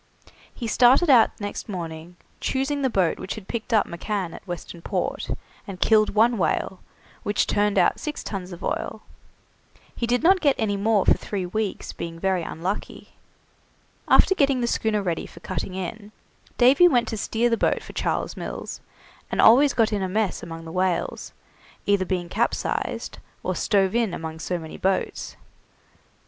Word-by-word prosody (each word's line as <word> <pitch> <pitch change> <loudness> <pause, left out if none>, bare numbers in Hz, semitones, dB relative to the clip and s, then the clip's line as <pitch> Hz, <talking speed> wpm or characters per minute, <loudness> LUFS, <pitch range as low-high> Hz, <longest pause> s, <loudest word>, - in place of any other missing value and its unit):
He 240 - -7
started 255 +8 +5
out 240 -4 +5
next 205 +1 -5
morning, 170 -2 -6 0.2
choosing 275 +2 -1
the 265 - +2
boat 190 -7 +1
which 185 - -5
had 210 -3 -10
picked 235 +1 -4
up 215 -3 +4
McCann 180 0 -3
at - - -12
Western 175 -1 -7
Port, - - -2 0.4
and 190 -2 -7
killed 215 0 +3
one 230 +1 +4
whale, 185 +1 0 0.4
which 205 - +1
turned 205 0 +1
out - - +3
six 300 -1 -5
tuns 190 -2 -5
of 175 - -9
oil. - - -3 0.9
He 235 - -2
did 245 +3 +1
not 370 +2 +5
get 285 -3 +4
any 215 -4 0
more 205 0 +2
for - - +6
three 195 -3 -4
weeks, 210 +2 -3
being 165 0 -6
very 190 0 +1
unlucky. 175 +5 -5 1.0
After - - +5
getting 275 -6 +2
the 240 - 0
schooner 220 -3 0
ready 170 -3 -2
for - - -14
cutting 185 +1 -4
in, 205 +3 -6 0.5
Davy 270 +8 +7
went 245 -8 +2
to - - -3
steer 230 +3 0
the - - +4
boat - - 0
for - - -11
Charles - - -2
Mills, - - -6 0.5
and - - -3
always 275 +5 +6
got 225 -2 +2
in 205 - 0
a 190 - -1
mess 210 0 0
among 165 0 -8
the 160 - -8
whales, 185 0 -1 0.5
being 205 0 +4
either 185 -2 -1
capsized 230 +6 -2 0.2
or - - -1
stove 195 -2 +1
in 230 -5 +1
among 160 0 -6
so 180 +2 -2
many 160 -2 -8
boats. 190 0 -1
205 Hz, 170 wpm, -24 LUFS, 180-235 Hz, 1.0 s, Davy